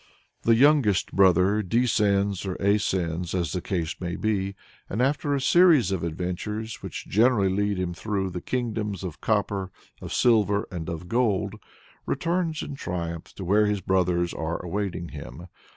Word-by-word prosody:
The 115 - +4
youngest 130 -6 +4
brother 95 +2 +4
descends 100 -3 +1
or 95 - -2
ascends 95 -4 0
as 85 -5 -1
the 90 - -2
case 85 -2 -2
may 90 -1 -3
be, 100 -2 -1 0.3
and 105 - -3
after 145 +2 +1
a - - 0
series 155 - +5
of 95 -4 -2
adventures 90 +7 -4
which - - -7
generally 110 -2 +3
lead 100 +1 0
him 90 -1 -2
through 95 0 -2
the 90 - -5
kingdoms 110 -6 -3
of 85 -4 -6
copper, 100 -3 0 0.3
of - - -7
silver, 105 -4 +3
and 85 -2 -5
of 85 +1 -6
gold, 105 -3 +1 0.5
returns 170 -2 -1
in 145 - -6
triumph 85 -8 -4
to 95 - -6
where 105 +3 +3
his 105 -1 -1
brothers 90 -2 +1
are 80 +1 -3
awaiting 90 -2 -3
him. 70 +2 -9
100 Hz, 155 wpm, -26 LUFS, 90-110 Hz, 0.5 s, series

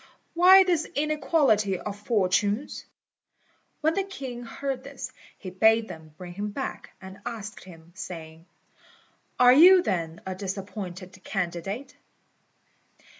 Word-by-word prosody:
Why 370 +3 +8
this 345 -4 0
inequality 285 - +2
of 200 +3 -6
fortunes?" 205 +3 0 1.0
When 315 +1 +2
the 390 - 0
king 270 -11 -7
heard 265 +2 -5
this, 270 -2 -8 0.3
he 185 - -8
bade 220 +4 +3
them 155 -1 -11
bring 180 -1 -9
him 205 +3 -4
back, 205 - -6
and 190 0 -11
asked 225 -3 -7
him, 170 -2 -15
saying, 165 -2 -9 0.9
"Are 250 0 +8
you, 355 +6 +8
then, 165 - -2
a 190 - -3
disappointed 190 -1 -7
candidate?" 190 +6 -4
210 Hz, 120 wpm, -26 LUFS, 185-275 Hz, 1.0 s, Why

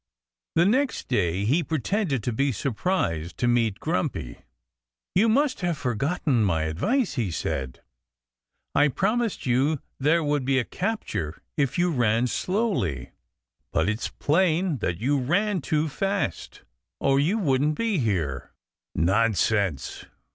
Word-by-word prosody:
The 170 - +5
next 260 +7 +1
day 100 -5 +1
he 145 +10 +3
pretended 160 - -1
to 120 - -1
be 140 +4 +1
surprised 105 - -1
to 120 - 0
meet 115 -4 +2
Grumpy. 140 - -2 0.7
"You 215 +5 +4
must 265 +2 +2
have 175 -3 0
forgotten 135 0 0
my 85 -6 +1
advice," 195 - 0
he 115 -8 -1
said. 65 -5 -3 0.9
"I 145 - +5
promised 215 - -1
you 130 +5 +2
that 140 - -10 0.2
there 160 +5 +3
would 145 -2 0
be 135 +1 +1
a 130 - +2
capture 175 - -3
if 140 -4 0
you 175 0 +2
ran 120 -4 +2
slowly. 125 - -1 0.6
But 80 +2 +1
it's 110 +2 -1
plain 170 -1 +1
that 90 -5 -1
you 135 +8 +1
ran 185 +8 +1
too 155 +2 0
fast, 195 - -3 0.4
or 135 0 +3
you 170 +10 +2
wouldn't 150 -5 +1
be 225 -6 0
here." 80 - -2 0.4
"Nonsense!" 100 - +1
135 Hz, 135 wpm, -25 LUFS, -, 0.9 s, The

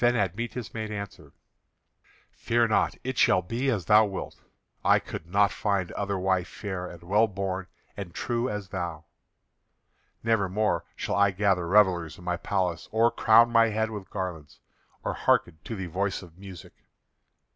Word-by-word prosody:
Then 120 0 +4
Admetus 115 +4 -2
made 110 -1 -4
answer: 100 -2 -7 1.0
"Fear 115 0 +1
not, 110 - +2
it 130 -1 -3
shall 90 - +4
be 120 +9 -1
as 105 -9 -1
thou 105 +3 +6
wilt. 95 -2 -6 0.4
I - - +5
could 85 - -7
not 100 +3 +3
find 100 -4 -1
other 100 -1 -2
wife 95 -1 0
fair 95 -3 -5
and 85 -1 -11
well 105 +6 +3
born 95 -2 -4 0.3
and 100 -4 -6
true 120 +7 -2
as 105 -2 -5
thou. 85 -4 -4 1.2
Never 110 -4 +2
more 100 -3 0
shall - - -3
I 100 +1 +4
gather 95 -2 +1
revellers 90 -4 +3
in - - -13
my 90 0 -1
palace, 90 -2 -2
or 115 +2 +3
crown 115 +1 +5
my 115 -1 +5
head 110 0 -1
with 100 -4 -7
garlands, 90 -7 -6 0.4
or - - -1
hearken 80 - +1
to 115 - -5
the 95 -2 -4
voice 95 +3 -2
of 85 -2 -14
music. 95 -2 -11
100 Hz, 165 wpm, -27 LUFS, 90-110 Hz, 1.2 s, thou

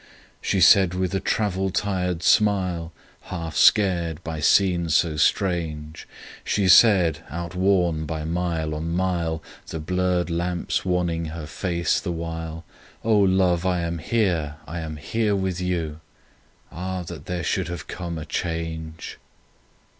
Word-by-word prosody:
— - - -32
She 95 - +2
said 90 +1 +6
with 95 0 -1
a 95 - +1
travel 95 -1 0
tired 90 -3 -1
smile, 90 -6 +2 0.3
Half 80 -4 -5
scared 85 -6 +3
by 80 -1 -4
scene 85 0 +3
so 80 +1 +2
strange; 80 -1 -1 0.4
She 100 -2 +1
said, 90 -6 +6
outworn 85 0 0
by 80 -1 -4
mile 80 -2 -1
on 80 +2 -3
mile, 85 -2 -1 0.2
The 80 - -5
blurred 90 +1 0
lamps 85 +1 -1
wanning 85 -2 0
her 80 0 -6
face 85 +1 -1
the 90 - -4
while, 80 0 -5 0.4
"O 110 -1 +3
Love, 95 -3 +3
I 90 -1 +1
am 85 0 -3
here; 85 -6 0
I 85 +3 -5
am 80 -1 -5 0.4
with 95 -2 -2
you!"... 85 -4 -2 0.7
Ah, 90 +1 -4
that 80 -3 -9
there 90 -2 -3
should 95 -2 -1
have 85 -2 -6
come 85 -2 -5
a 75 - -6
change! 80 -1 -4
85 Hz, 140 wpm, -24 LUFS, 80-90 Hz, 0.7 s, said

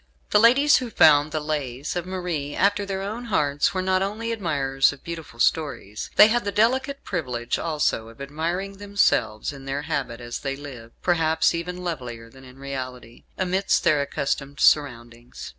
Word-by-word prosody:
The - - +5
ladies 275 +7 +6
who 250 -2 -4
found 150 -6 +5
the 155 - -1
"Lays" 145 -2 -3
of 175 0 -3
Marie 175 -6 -3
after 200 +1 +1
their 195 -1 -3
own 220 +5 -5
hearts 145 -10 +1
were 185 - 0
not 185 0 +1
only 215 +4 -2
admirers 140 -10 +1
of 145 - -13
beautiful 165 -8 -8
stories; 130 -7 -1
they 210 - +9
had 240 +2 +1
the 200 - -2
delicate 260 +6 +1
privilege 125 -9 -3
also 150 -8 -1
of 115 - -16
admiring 170 +8 -4
themselves 150 - +1
in 135 -1 -11
their 140 +2 -3
habit 140 -6 -3
as 120 -1 -6
they 135 -1 -3
lived 130 -5 -11
perhaps 165 -2 +2
even 180 +2 -4
lovelier 120 -9 -6
than 130 +1 -16
in 130 0 -14
reality 130 -3 -7
amidst 190 +1 +1
their 155 -4 +3
accustomed 140 0 -3
surroundings. 120 -5 0
150 Hz, 170 wpm, -24 LUFS, 135-190 Hz, -, they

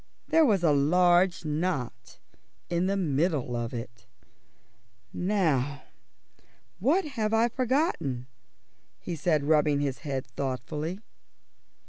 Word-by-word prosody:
There 325 - +5
was 200 -8 +2
a 160 - +4
large 175 +5 +3
knot 150 -7 -3 0.5
in 175 +2 +1
the 200 +1 0
middle 150 -6 0
of 120 -1 -3
it. 115 -2 -8 1.1
"Now, 150 -8 0 1.0
what 305 - +2
have 225 -7 -1
I 230 +2 +3
forgotten?" 250 - -1 0.7
he 175 - -5
said, 155 -2 +1
rubbing 150 -1 +3
his 140 -2 -2
head 135 -4 -4
thoughtfully. 150 - -4
160 Hz, 105 wpm, -28 LUFS, 135-190 Hz, 1.1 s, There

